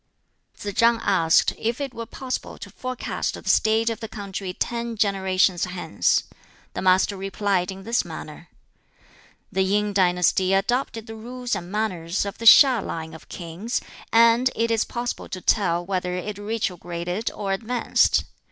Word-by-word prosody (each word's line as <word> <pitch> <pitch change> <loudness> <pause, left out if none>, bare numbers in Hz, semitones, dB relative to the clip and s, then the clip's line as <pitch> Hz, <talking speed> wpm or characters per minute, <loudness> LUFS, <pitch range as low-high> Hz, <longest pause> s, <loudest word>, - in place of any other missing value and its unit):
Tsz 205 -1 -5
chang 230 +2 +4
asked 165 -5 +3
if 230 +3 -1
it 275 -3 -4
were 230 -1 -6
possible 260 -1 -5
to - - -10
forecast 255 -1 -4
the - - -11
state 220 +1 +3
of 230 -1 -1
the 225 - -6
country 200 -3 -6
ten 235 +4 -3
generations 190 -3 +2
hence. 180 0 0 0.5
The - - -4
Master 185 +2 +3
replied 195 -1 -1
in 190 0 -9
this 230 +3 +1
manner: - - -9 1.0
"The 190 - 0
Yin 205 +2 +1
dynasty 185 0 +2
adopted 225 +2 -1
the 225 - -8
rules 245 +2 -5
and 175 +1 -6
manners 190 -4 -1
of 200 +1 -6
the 230 - -6
HiŠ 250 -1 +8
line 160 -1 -5
of 160 - -13
kings, 175 +7 -4 0.3
and 230 +2 +5
it 230 0 0
is 225 -1 +2
possible 240 0 -4
to 185 - -5
tell 175 -3 +1
whether 180 -1 -2
it 200 +3 -5
retrograded 180 -2 -3
or 195 -2 -2
advanced. 230 +4 +2
205 Hz, 155 wpm, -24 LUFS, 185-230 Hz, 1.0 s, HiŠ